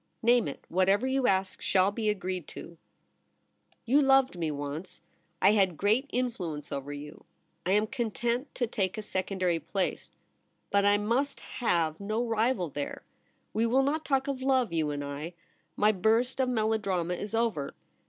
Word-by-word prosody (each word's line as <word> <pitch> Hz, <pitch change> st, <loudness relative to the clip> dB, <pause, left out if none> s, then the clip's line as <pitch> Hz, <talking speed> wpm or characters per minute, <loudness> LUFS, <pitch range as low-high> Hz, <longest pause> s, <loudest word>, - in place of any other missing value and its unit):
' -, -, -45 dB
Name 240 Hz, -2 st, +4 dB
it. 140 Hz, -, -7 dB
Whatever 195 Hz, +6 st, +2 dB
you 265 Hz, -1 st, +1 dB
ask 190 Hz, -1 st, 0 dB
shall 190 Hz, +1 st, +3 dB
be 215 Hz, 0 st, -1 dB
agreed 185 Hz, -4 st, -3 dB
to.' 170 Hz, -, -9 dB, 1.1 s
'You 270 Hz, +5 st, +4 dB
loved 270 Hz, -4 st, +4 dB
me 165 Hz, -3 st, -2 dB
once. 145 Hz, +4 st, -5 dB, 0.4 s
I 195 Hz, -, +6 dB
had 190 Hz, -6 st, +2 dB
great 220 Hz, +7 st, +2 dB
influence 180 Hz, -, -3 dB
over 140 Hz, +1 st, -4 dB
you. 145 Hz, +1 st, -9 dB, 0.4 s
I 190 Hz, -, +3 dB
am 210 Hz, +1 st, +3 dB
content 240 Hz, +3 st, -2 dB
to 245 Hz, -, +1 dB
take 205 Hz, -3 st, -2 dB
a 215 Hz, -, -4 dB
secondary 185 Hz, -3 st, -1 dB
place; 180 Hz, +4 st, -2 dB, 0.6 s
but 200 Hz, 0 st, +3 dB
I 205 Hz, 0 st, +5 dB
must 235 Hz, +7 st, 0 dB
have 165 Hz, -9 st, 0 dB
no 215 Hz, +4 st, -1 dB
rival 225 Hz, -5 st, +1 dB
there. 145 Hz, +1 st, -5 dB, 0.3 s
\\ -, -, -43 dB
e 225 Hz, +2 st, +2 dB
will 260 Hz, +4 st, +3 dB
not 305 Hz, +3 st, 0 dB
talk 270 Hz, -1 st, +1 dB
of 270 Hz, -2 st, -3 dB
love— 260 Hz, -7 st, +2 dB
you 160 Hz, -2 st, +1 dB
and 145 Hz, -1 st, -3 dB
I. 145 Hz, +4 st, -6 dB, 0.4 s
My 210 Hz, +1 st, +4 dB
burst 225 Hz, +7 st, +1 dB
of 260 Hz, -1 st, +2 dB
melodrama 215 Hz, -7 st, 0 dB
is 205 Hz, +5 st, -4 dB
over. 225 Hz, -12 st, -1 dB
205 Hz, 170 wpm, -29 LUFS, 175-240 Hz, 1.1 s, I